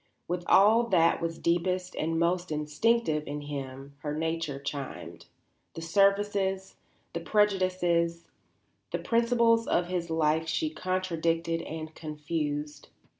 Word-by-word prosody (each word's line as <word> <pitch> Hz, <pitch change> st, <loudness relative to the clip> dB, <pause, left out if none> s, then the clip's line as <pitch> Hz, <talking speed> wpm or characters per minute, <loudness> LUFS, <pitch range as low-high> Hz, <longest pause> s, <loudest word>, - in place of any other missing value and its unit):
With 175 Hz, 0 st, -2 dB
all 225 Hz, +4 st, +6 dB
that 165 Hz, -6 st, +3 dB
was 165 Hz, -1 st, -2 dB
deepest 180 Hz, +2 st, 0 dB
and 165 Hz, +1 st, -1 dB
most 175 Hz, +1 st, 0 dB
instinctive 150 Hz, +4 st, +1 dB
in 145 Hz, +1 st, -4 dB
him 140 Hz, -1 st, -7 dB
her 150 Hz, 0 st, -4 dB
nature 160 Hz, -2 st, -2 dB
chimed; 140 Hz, -1 st, -6 dB, 0.5 s
the 165 Hz, -, -6 dB
surfaces, 195 Hz, +1 st, +1 dB, 0.4 s
the 170 Hz, -, -2 dB
prejudices, 180 Hz, -4 st, +1 dB, 0.7 s
the -, -, 0 dB
principles 230 Hz, -1 st, +2 dB
of 175 Hz, 0 st, +1 dB
his 175 Hz, -2 st, -2 dB
life 160 Hz, 0 st, +1 dB
she 155 Hz, -1 st, -1 dB
contradicted 165 Hz, -2 st, -1 dB
and 155 Hz, 0 st, -7 dB
confused. 150 Hz, -1 st, -4 dB
170 Hz, 120 wpm, -29 LUFS, 155-185 Hz, 0.7 s, all